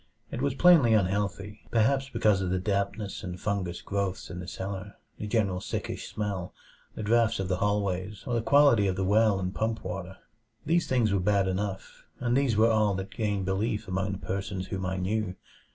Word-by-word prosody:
It - - -4
was 140 -1 0
plainly 150 -10 +6
unhealthy, 100 +1 -1
perhaps 135 +4 +2
because 110 -5 +2
of 95 - -1
the 95 - +1
dampness 100 +2 -2
and 90 -1 -6
fungous 100 -5 -2
growths 100 -2 -3
in 90 - -6
the 90 - -7
cellar, 95 +2 -6 0.2
the 105 - -4
general 100 -5 0
sickish - - -4
smell, 100 -4 -4 0.4
the - - -5
drafts 115 0 +2
of 95 -1 -2
the 90 - +1
hallways, 100 0 -1
or 125 - -2
the 115 - +1
quality 135 -5 +5
of 95 - 0
the 95 - -1
well 105 0 +3
and 90 0 -3
pump 110 0 -2
water. 95 0 -5 0.5
These 170 +3 +2
things 120 -6 +2
were 100 - +2
bad 100 +1 +2
enough, 95 +1 -4
and 120 0 +1
these 135 -5 +2
were 115 +1 +5
all 105 -2 +2
that 95 +1 -5
gained 105 -4 -1
belief 105 +3 -1
among 95 +1 -1
the - - -4
persons 95 0 -4
whom 95 -1 -3
I 95 0 -2
knew. 95 0 -1
100 Hz, 195 wpm, -28 LUFS, 95-110 Hz, 0.5 s, plainly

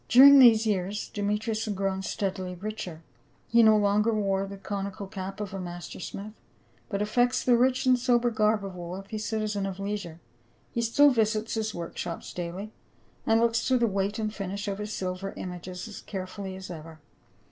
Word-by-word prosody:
During 275 +3 +9
the.se 230 -3 +7
years 200 0 -1
Demetrius 215 +2 -1
has 210 -2 -2
grown 190 0 -1
steadily 190 -2 -3
richer; 180 -4 -6 0.5
he 235 0 +6
no 220 -1 +7
longer 210 +2 +3
wears 195 -2 0
the 200 - -7
conical 200 0 -4
cap 195 0 -6
of 205 -2 -5
a 195 - -4
master 175 -1 -7
smith, 205 +3 -7 0.6
but 200 -1 -1
affects 245 +4 +2
the 245 - +5
rich 255 +2 +2
and 255 -1 +4
sober 240 -1 +2
garb 215 -2 +2
of 190 -2 -7
a - - -9
wealthy 195 +5 -6
citizen 210 -2 -2
of 190 0 -6
leisure; 200 -5 -4 0.5
he 235 - -1
still 280 +5 +5
visits 220 -2 +1
his 220 -1 -2
work 170 -1 -6
shops 170 - -5
daily, 180 +4 -5 0.6
and 225 0 +4
looks 230 0 +2
to 260 -1 +4
the 240 - +3
weight 200 -1 -1
and 215 -1 -2
finish 200 0 -4
of 200 0 -3
his 210 0 -4
silver 185 0 -4
images 180 +1 -6
as 210 - -9
carefully 190 0 -6
as 190 -1 -8
ever. 160 -1 -9
205 Hz, 185 wpm, -28 LUFS, 190-220 Hz, 0.6 s, During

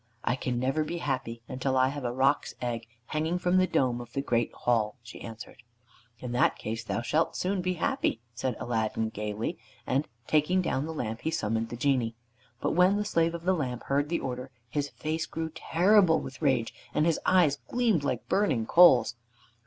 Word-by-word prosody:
"I 120 - +1
can 125 -2 -2
never 135 +5 +1
be 170 +3 -4
happy 130 -7 -3
until 130 +1 -1
I 130 0 +4
have 145 0 -5
a 120 - 0
roc's 135 +3 +1
egg 120 -2 -3 0.2
hanging 160 +5 -1
from 180 0 +2
the 185 0 +4
dome 125 -6 +1
of 120 0 -12
the 135 - 0
great 120 -3 +1
hall," 110 -3 0
she 115 - -11
answered. 115 0 -9 0.6
"In 125 0 -6
that 120 - +3
case 110 +1 -4
thou 115 - -2
shalt 155 +6 +1
soon 185 +1 -1
be 185 +1 0
happy," 180 - 0
said 125 +1 -2
Aladdin 110 -1 -1
gaily, 105 +1 -4 0.3
and 140 +4 0 0.2
taking 155 +7 +2
down 155 -5 -1
the - - -4
lamp, 115 -8 -4
he - - -1
summoned 115 -7 -1
the 120 - -6
Genie. 120 -3 +1 0.4
But - - 0
when 180 +4 +4
the 210 - -1
Slave 165 -4 +1
of 170 - -7
the 185 +2 +3
Lamp 125 -8 -3
heard 145 +2 0
the 170 - 0
order 125 0 -4 0.2
his 145 +3 -2
face 160 +2 -3
grew 160 0 -4
terrible 175 +2 +4
with 130 +3 -8
rage, 130 -6 +1 0.2
and 150 - +3
his 165 -1 +2
eyes 170 -7 +4
gleamed 230 -11 +1
like 130 -4 -2
burning 160 - +1
coals. 130 -8 +6
135 Hz, 195 wpm, -28 LUFS, 120-165 Hz, 0.6 s, coals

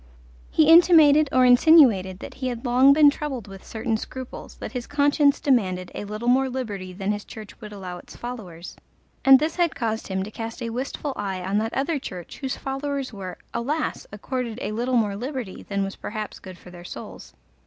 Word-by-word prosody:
He 315 - +3
intimated 315 -3 +7
or 255 0 +4
insinuated 245 - +6
that - - -8
he 260 - -4
had 245 0 -5
long 255 +3 +5
been 290 0 +7
troubled 275 -8 -5
with 195 -1 -11
certain 225 0 -2
scruples, 260 +3 -8
that - - -7
his 250 -2 -5
conscience 285 0 +3
demanded 185 -9 0
a - - -5
little 215 +3 -5
more 260 +2 +3
liberty 210 -8 -5
than 195 +2 -2
his 205 -1 -3
church 215 -2 -11
would 210 -1 -9
allow 185 -3 -7
its - - -14
followers, 195 -9 -8 0.5
and 270 0 +9
this 310 +5 -2
had 345 -2 +1
caused 220 -1 -2
him 190 -1 -2
to 210 - -8
cast 225 +2 -6
a 230 - -3
wistful 270 +3 -4
eye 190 -3 -4
on 195 +3 0
that 225 +1 -3
other 285 +3 0
church 180 -8 -8
whose 265 -2 -3
followers 275 -1 -4
were, 185 -3 -7 0.2
alas! 295 +7 -2
accorded 235 +2 -4
a - - -3
little 245 +3 0
more 210 -3 +1
liberty 250 -2 -5
than 200 -1 0
was 195 0 -5
perhaps 215 0 -6
good 185 -2 -11
for 180 - -14
their 175 -1 -11
souls. - - -10
235 Hz, 195 wpm, -24 LUFS, 200-270 Hz, 0.5 s, and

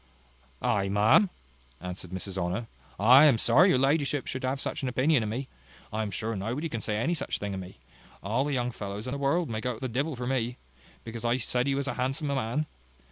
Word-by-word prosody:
"I, 100 -1 +1
ma'am!" 105 - +5 0.5
answered 90 0 -6
Mrs 95 +1 -5
Honour, 95 +5 -2 0.3
"I 125 +8 +8
am 140 -6 +6
sorry 135 - +5
your 135 - +4
ladyship 140 +1 +1
should 130 - -4
have 130 +1 -1
such - - -3
an 135 - -1
opinion 130 +2 +3
of 110 - -2
me. 130 +5 -3 0.5
I 110 - 0
am 110 - -2
sure 110 +3 -3
nobody 120 +11 -3
can 115 -5 -4
say 105 +1 -1
any 135 +11 +1
such 145 -5 -2
thing 100 -1 -4
of 95 - -4
me. 95 0 -9 0.5
All 115 +7 +1
the 145 0 -2
young 125 -1 0
fellows 100 -1 -6
in 130 - -4
the 140 - -3
world 150 +5 +1
may 110 -1 -3
go 125 0 -2
to - - -11
the 130 - -2
divil 135 +5 -1
for 125 0 -5
me. 125 -1 -1 0.5
Because 115 0 -7
I 120 +1 +2
said 125 +1 -1
he 135 - +1
was 140 0 -2
a - - -1
handsome 135 +4 -1
man? 135 +2 -1
125 Hz, 230 wpm, -28 LUFS, 110-140 Hz, 0.5 s, I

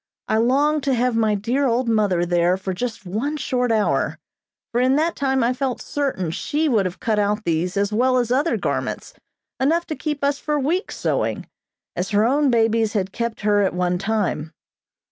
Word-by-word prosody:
I 220 - +1
longed 285 +6 +2
to 270 -2 +2
have 245 0 +1
my 220 -2 +2
dear 245 +7 0
old 240 +1 +1
mother 205 -6 +2
there 175 +1 +2
for 190 0 -4
just 220 +1 -4
one 235 +12 -2
short 250 -3 0
hour, 215 -2 +1 0.5
for 240 - +1
in 260 +1 +3
that 320 +3 +1
time 265 -2 +1
I 240 +2 +2
felt 260 -1 -2
certain 260 - -2
she 300 - -1
would 215 -9 +2
have 180 - -8
cut 220 -2 0
out 210 +1 0
these 170 +3 -1
as 200 +1 0
well 255 +3 +3
as 240 -1 0
other 285 +6 +2
garments, - - -3 0.5
enough 330 +6 +2
to 310 - -4
keep 295 -2 -4
us 280 0 +1
for 300 -1 -1
weeks 330 +8 -1
sewing, - - -1 0.5
as 180 +2 -2
her 210 0 +3
own 280 +3 +3
babies 225 -2 +2
had 195 -3 -1
kept 235 -1 -3
her 205 -1 +3
at 190 -3 0
one 180 0 0
time. 195 -6 -1
230 Hz, 195 wpm, -22 LUFS, 200-270 Hz, 0.5 s, in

